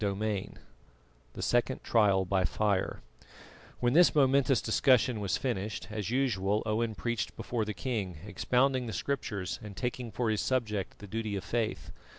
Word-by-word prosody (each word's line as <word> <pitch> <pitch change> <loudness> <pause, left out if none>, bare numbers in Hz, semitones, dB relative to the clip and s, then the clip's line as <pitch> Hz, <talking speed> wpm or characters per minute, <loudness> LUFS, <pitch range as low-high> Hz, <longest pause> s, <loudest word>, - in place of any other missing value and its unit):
CHAPTER 100 +1 -1
X 105 -3 -2 0.8
THE - - -7
SECOND 120 +2 +1
TRIAL 100 -4 +3
BY 95 0 +1
FIRE 100 +2 0 0.8
When 120 0 +2
this 175 +1 +6
momentous 135 -2 +4
discussion 125 0 +3
was 100 -3 0
finished, 110 -6 -3
as 105 -2 -3
usual 110 -6 +1
Owen 110 +1 0
preached 120 -5 -2
before 115 -3 -2
the 105 -1 -4
king, 95 -4 -3
expounding 125 +5 +1
the 110 - -4
Scriptures 100 -7 -3
and 105 -2 -9
taking 125 -1 -3
for 115 0 -1
his 105 - 0
subject 105 -7 -1
the 105 - -10
duty 110 0 -3
of 95 - -3
faith. 115 -2 -2
110 Hz, 160 wpm, -30 LUFS, 100-125 Hz, 0.8 s, this